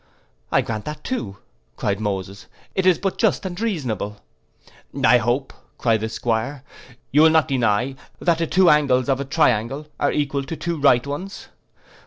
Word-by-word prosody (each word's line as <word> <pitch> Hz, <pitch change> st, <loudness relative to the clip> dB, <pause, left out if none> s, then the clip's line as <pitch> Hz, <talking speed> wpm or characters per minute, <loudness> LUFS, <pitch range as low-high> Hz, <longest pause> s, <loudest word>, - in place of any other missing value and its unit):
'I -, -, +4 dB
grant 110 Hz, -2 st, -5 dB
that 150 Hz, 0 st, -6 dB
too,' 105 Hz, -, -4 dB, 0.4 s
cried 100 Hz, -1 st, -1 dB
Moses, 100 Hz, -2 st, -4 dB, 0.3 s
'it 190 Hz, -1 st, +1 dB
is 180 Hz, -3 st, +5 dB
but 195 Hz, -2 st, -3 dB
just 220 Hz, -3 st, +1 dB
and 180 Hz, +1 st, -5 dB
reasonable.'—'I 110 Hz, -, -2 dB
hope,' 120 Hz, +4 st, -1 dB, 0.2 s
cried 115 Hz, -2 st, +2 dB
the 110 Hz, -, -2 dB
'Squire, 115 Hz, +4 st, -2 dB, 0.5 s
'you 150 Hz, -, +5 dB
will 160 Hz, -, +7 dB
not 160 Hz, -1 st, +3 dB
deny, 125 Hz, -2 st, +1 dB, 0.3 s
that 170 Hz, -2 st, +1 dB
the 165 Hz, -, 0 dB
two 185 Hz, +2 st, +4 dB
angles 140 Hz, -5 st, +3 dB
of 135 Hz, -1 st, +2 dB
a 140 Hz, -, -3 dB
triangle 135 Hz, -1 st, +1 dB
are 145 Hz, -, +2 dB
equal 140 Hz, -1 st, -1 dB
to 165 Hz, -, -5 dB
two 170 Hz, -1 st, -3 dB
right 125 Hz, -3 st, +4 dB
ones. 185 Hz, +8 st, -6 dB
135 Hz, 165 wpm, -22 LUFS, 110-160 Hz, 0.5 s, will